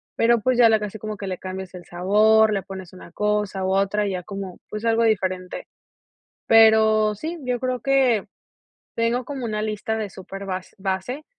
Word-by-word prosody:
pero, 235 Hz, 0 st, +3 dB
pues, 255 Hz, +1 st, +1 dB
ya 235 Hz, -2 st, +7 dB
la 220 Hz, -1 st, +4 dB
casi 210 Hz, 0 st, -6 dB
como 215 Hz, 0 st, -5 dB
que 200 Hz, -, -6 dB
le 185 Hz, -1 st, -3 dB
cambias 185 Hz, 0 st, -7 dB
el 175 Hz, -2 st, -10 dB
sabor, 215 Hz, +5 st, +3 dB
le 195 Hz, -, -1 dB
pones 190 Hz, -2 st, -9 dB
una 180 Hz, -2 st, -13 dB
cosa 210 Hz, -1 st, -1 dB
u 190 Hz, -, 0 dB
otra 200 Hz, +2 st, +1 dB
y -, -, -2 dB
ya 180 Hz, -1 st, -4 dB
como, 195 Hz, -2 st, -7 dB
pues, 215 Hz, +2 st, -5 dB
algo 230 Hz, 0 st, +3 dB
diferente, 185 Hz, -4 st, -1 dB, 0.8 s
pero 220 Hz, -1 st, +5 dB
sí, 320 Hz, +11 st, -5 dB
yo 250 Hz, -1 st, -1 dB
creo 255 Hz, -2 st, -2 dB
que, 260 Hz, -6 st, +2 dB, 0.7 s
tengo 230 Hz, +2 st, 0 dB
como 270 Hz, -3 st, -6 dB
una 215 Hz, -1 st, -2 dB
lista 215 Hz, +1 st, -2 dB
de 210 Hz, -3 st, -4 dB
súper 195 Hz, +2 st, -9 dB
bas 185 Hz, -1 st, -5 dB
base 195 Hz, +10 st, -3 dB
210 Hz, 190 wpm, -23 LUFS, 190-230 Hz, 0.8 s, ya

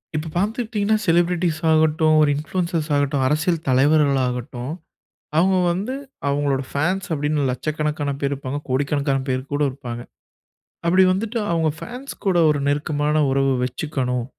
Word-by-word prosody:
இப்ப 155 Hz, +1 st, -2 dB
பாத்துக்கிட்டீங்கன்னா, 215 Hz, +1 st, 0 dB
ஷெலிப்ரெட்டீஸ் 170 Hz, -1 st, +2 dB
ஆகட்டும், 155 Hz, 0 st, +3 dB
ஒரு 150 Hz, -, +4 dB
இன்ஃப்லியன்ஸஸ் 165 Hz, +1 st, -2 dB
ஆகட்டும், 140 Hz, -1 st, +1 dB
அரசியல் 160 Hz, +3 st, 0 dB
தலைவர்களாகட்டும், 130 Hz, -2 st, +1 dB, 0.7 s
அவுங்க 185 Hz, +3 st, +4 dB
வந்து 200 Hz, +9 st, -2 dB, 0.3 s
அவுங்களோட 140 Hz, -1 st, 0 dB
ஃபேன்ஸ் 180 Hz, +6 st, -1 dB
அப்டீன்னு, 150 Hz, -1 st, 0 dB
லட்சக்கணக்கான 150 Hz, +2 st, -2 dB
பேர் 140 Hz, 0 st, 0 dB
இருப்பாங்க. 140 Hz, +1 st, -4 dB
கோடிக்கணக்கான 140 Hz, +1 st, 0 dB
பேர் 130 Hz, 0 st, 0 dB
கூட 145 Hz, -, 0 dB
இருப்பாங்க. 125 Hz, -3 st, -7 dB, 0.8 s
அப்பிடி 185 Hz, +3 st, +5 dB
வந்துட்டு 220 Hz, +5 st, -2 dB
அவுங்க 165 Hz, -2 st, +2 dB
ஃபேன்ஸ் 250 Hz, +4 st, -7 dB
கூட 190 Hz, -3 st, +3 dB
ஒரு 150 Hz, -1 st, +1 dB
நெருக்கமான 150 Hz, +1 st, 0 dB
உறவு 135 Hz, 0 st, +2 dB
வச்சிக்கணும். 125 Hz, -2 st, -2 dB
150 Hz, 125 wpm, -22 LUFS, 140-170 Hz, 0.8 s, அப்பிடி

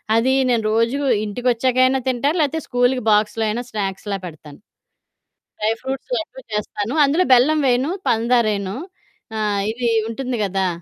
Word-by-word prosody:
అదీ 255 Hz, +4 st, +3 dB, 0.2 s
నేను 230 Hz, -3 st, +1 dB
రోజూ 230 Hz, +5 st, +1 dB, 0.3 s
ఇంటికొచ్చాకైనా 255 Hz, +4 st, +1 dB
తింటా, 260 Hz, +3 st, +1 dB
లేతే 310 Hz, +1 st, +1 dB
స్కూలుకి 245 Hz, 0 st, +1 dB
బాక్స్‌లో 210 Hz, +1 st, +2 dB
అయినా 235 Hz, +3 st, -2 dB
స్నాక్స్‌లా 200 Hz, -1 st, -3 dB
పెడతాను. 150 Hz, -2 st, -11 dB, 1.0 s
డ్రై 215 Hz, +1 st, +1 dB
ఫ్రూట్స్ 265 Hz, -, -5 dB
లడ్డూ 295 Hz, -5 st, -6 dB
చేస్తాను. 210 Hz, +2 st, -3 dB
అందులో 330 Hz, +6 st, +2 dB
బెల్లం 295 Hz, +5 st, +4 dB
వెయను, 255 Hz, +6 st, +1 dB, 0.2 s
పందారెయను. 220 Hz, -4 st, +1 dB, 0.6 s
ఆహ్, 205 Hz, -2 st, 0 dB
ఇదీ 235 Hz, 0 st, -1 dB, 0.2 s
ఉంటుంది 250 Hz, 0 st, -3 dB
గదా! 190 Hz, 0 st, 0 dB
235 Hz, 130 wpm, -20 LUFS, 210-260 Hz, 1.0 s, బెల్లం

